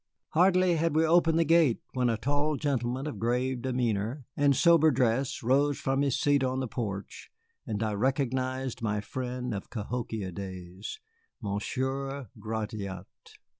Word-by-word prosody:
Hardly 180 Hz, 0 st, +4 dB
had 165 Hz, -1 st, +1 dB
we 160 Hz, +1 st, +4 dB
opened 165 Hz, 0 st, +4 dB
the 165 Hz, -, +3 dB
gate 160 Hz, -6 st, +4 dB, 0.2 s
when 125 Hz, -2 st, +1 dB
a 115 Hz, -, +1 dB
tall 145 Hz, +5 st, 0 dB
gentleman 130 Hz, -2 st, -1 dB
of 150 Hz, -, -5 dB
grave 125 Hz, +2 st, 0 dB
demeanor 120 Hz, 0 st, -1 dB
and 140 Hz, -1 st, +3 dB
sober 165 Hz, -1 st, +6 dB
dress 130 Hz, -1 st, +1 dB
rose 140 Hz, +4 st, +3 dB
from 135 Hz, +1 st, 0 dB
his 140 Hz, -3 st, +1 dB
seat 145 Hz, -2 st, +3 dB
on 130 Hz, 0 st, 0 dB
the 130 Hz, -, -2 dB
porch, 100 Hz, -4 st, -5 dB, 0.4 s
and 110 Hz, -1 st, -2 dB
I 110 Hz, -1 st, 0 dB
recognized 130 Hz, +1 st, -1 dB
my 105 Hz, -2 st, 0 dB
friend 125 Hz, +2 st, -4 dB
of 100 Hz, -, -5 dB
Cahokia 110 Hz, -3 st, -4 dB
days, 95 Hz, +1 st, -7 dB, 0.4 s
Monsieur 130 Hz, +6 st, -3 dB
Gratiot. 105 Hz, -4 st, -4 dB
130 Hz, 145 wpm, -29 LUFS, 110-140 Hz, 0.4 s, sober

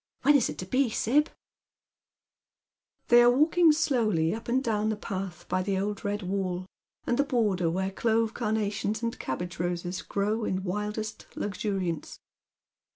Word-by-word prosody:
When 290 Hz, +2 st, +6 dB
is 270 Hz, -, +3 dB
it 150 Hz, -, -6 dB
to 185 Hz, -, -5 dB
be, 255 Hz, +6 st, +2 dB
Sib? 280 Hz, +8 st, +2 dB, 0.9 s
" -, -, -56 dB
They 240 Hz, 0 st, +8 dB
are 240 Hz, -, +7 dB
walking 315 Hz, +6 st, +5 dB
slowly 220 Hz, -, +1 dB
up 225 Hz, -, -7 dB
and 260 Hz, +3 st, +2 dB
down 215 Hz, -2 st, 0 dB
the 215 Hz, -, 0 dB
pi.th 195 Hz, -2 st, -6 dB
by 185 Hz, -, 0 dB
the 195 Hz, +1 st, -1 dB
old 205 Hz, +1 st, -2 dB
red 205 Hz, 0 st, -2 dB
wall, 185 Hz, -1 st, -2 dB, 0.4 s
and 240 Hz, -, 0 dB
the -, -, +5 dB
border 210 Hz, -, +1 dB
where 190 Hz, +3 st, -1 dB
clove 225 Hz, +2 st, +1 dB
carnations 215 Hz, -1 st, -1 dB
and 230 Hz, 0 st, -2 dB
cabbage 175 Hz, +7 st, -4 dB
ros?(j 175 Hz, +1 st, -3 dB
grow 210 Hz, +3 st, 0 dB
in 190 Hz, -2 st, -1 dB
wildest 210 Hz, +3 st, -4 dB
luxuriance. 195 Hz, -5 st, -3 dB
210 Hz, 155 wpm, -28 LUFS, 185-235 Hz, 0.9 s, They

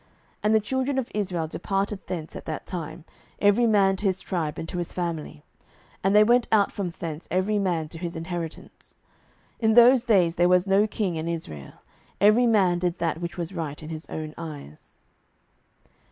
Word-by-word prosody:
07:021:024 -, -, -34 dB, 0.3 s
And 215 Hz, +1 st, +3 dB
the -, -, +6 dB
children 260 Hz, +5 st, -1 dB
of 260 Hz, -3 st, -2 dB
Israel 180 Hz, -6 st, -1 dB
departed 195 Hz, +4 st, -2 dB
thence 165 Hz, -3 st, -5 dB
at -, -, -8 dB
that 155 Hz, -, -5 dB
time, 165 Hz, -2 st, -6 dB, 0.3 s
every 205 Hz, +4 st, +4 dB
man 195 Hz, -3 st, +4 dB
to 205 Hz, -, -5 dB
his 190 Hz, -1 st, +1 dB
tribe 165 Hz, -6 st, -3 dB
and 165 Hz, -, -5 dB
to 180 Hz, -, -4 dB
his 175 Hz, -, -4 dB
family, 165 Hz, -, -4 dB, 0.6 s
and 195 Hz, +2 st, +3 dB
they 210 Hz, -, +8 dB
went 240 Hz, +2 st, +3 dB
out 210 Hz, -2 st, +4 dB
from 195 Hz, -3 st, -3 dB
thence 165 Hz, -2 st, -7 dB
every 195 Hz, +3 st, +1 dB
man 175 Hz, -5 st, 0 dB
to 165 Hz, -, -10 dB
his 175 Hz, 0 st, -5 dB
inheritance. 165 Hz, 0 st, -7 dB, 0.7 s
07:021:025 220 Hz, -, +3 dB
In -, -, +4 dB
those 240 Hz, +1 st, +7 dB
days 190 Hz, -8 st, +3 dB
there 175 Hz, 0 st, +4 dB
was 180 Hz, 0 st, +4 dB
no 200 Hz, +2 st, +3 dB
king 195 Hz, -5 st, -2 dB
in 160 Hz, +1 st, -3 dB
Israel: 80 Hz, -, -6 dB, 0.5 s
every 215 Hz, +5 st, +5 dB
man 190 Hz, -6 st, +3 dB
did 175 Hz, 0 st, -1 dB
that 165 Hz, -1 st, -2 dB
which 170 Hz, +1 st, -5 dB
was 170 Hz, +1 st, -4 dB
right 155 Hz, -3 st, -5 dB
in 155 Hz, -, -8 dB
his 160 Hz, -1 st, -7 dB
own 155 Hz, -1 st, -5 dB
eyes. 145 Hz, -, -10 dB
180 Hz, 195 wpm, -25 LUFS, 165-205 Hz, 0.7 s, they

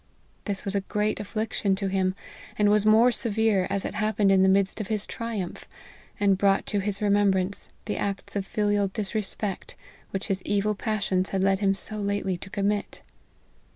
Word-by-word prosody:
This 200 Hz, -2 st, -3 dB
was 195 Hz, -, -2 dB
a 200 Hz, -, +1 dB
great 210 Hz, +2 st, -1 dB
affliction 210 Hz, -1 st, -1 dB
to 195 Hz, 0 st, -2 dB
him, 190 Hz, -1 st, 0 dB, 0.4 s
and 210 Hz, -1 st, +4 dB
was 210 Hz, 0 st, +3 dB
more 225 Hz, +3 st, +6 dB
severe, 220 Hz, -5 st, +2 dB
as 195 Hz, 0 st, -2 dB
it -, -, -3 dB
hap 215 Hz, 0 st, -1 dB
pened 200 Hz, -2 st, +4 dB
in 190 Hz, -1 st, +5 dB
the 190 Hz, -, +5 dB
midst 195 Hz, +2 st, +2 dB
of 205 Hz, -, -5 dB
his 215 Hz, -2 st, -1 dB
triumph, 225 Hz, -6 st, -5 dB, 0.5 s
and 200 Hz, -2 st, +3 dB
brought 195 Hz, -1 st, +3 dB
to 205 Hz, -, -1 dB
his 200 Hz, +1 st, -2 dB
remembrance 200 Hz, -2 st, +1 dB, 0.2 s
the 210 Hz, -, -2 dB
acts 200 Hz, 0 st, -3 dB
of 200 Hz, -, 0 dB
filial 205 Hz, 0 st, +1 dB
disrespect 205 Hz, -1 st, -4 dB, 0.3 s
which 195 Hz, +2 st, -3 dB
his 195 Hz, -3 st, -1 dB
evil 205 Hz, +2 st, 0 dB
passions 200 Hz, -3 st, -1 dB
had 190 Hz, -1 st, 0 dB
led 195 Hz, 0 st, +3 dB
him 195 Hz, -1 st, +2 dB
so 215 Hz, +2 st, -4 dB
lately 200 Hz, -2 st, -1 dB
to 195 Hz, -, -9 dB
commit. 205 Hz, +1 st, -2 dB
200 Hz, 185 wpm, -26 LUFS, 195-210 Hz, 0.5 s, more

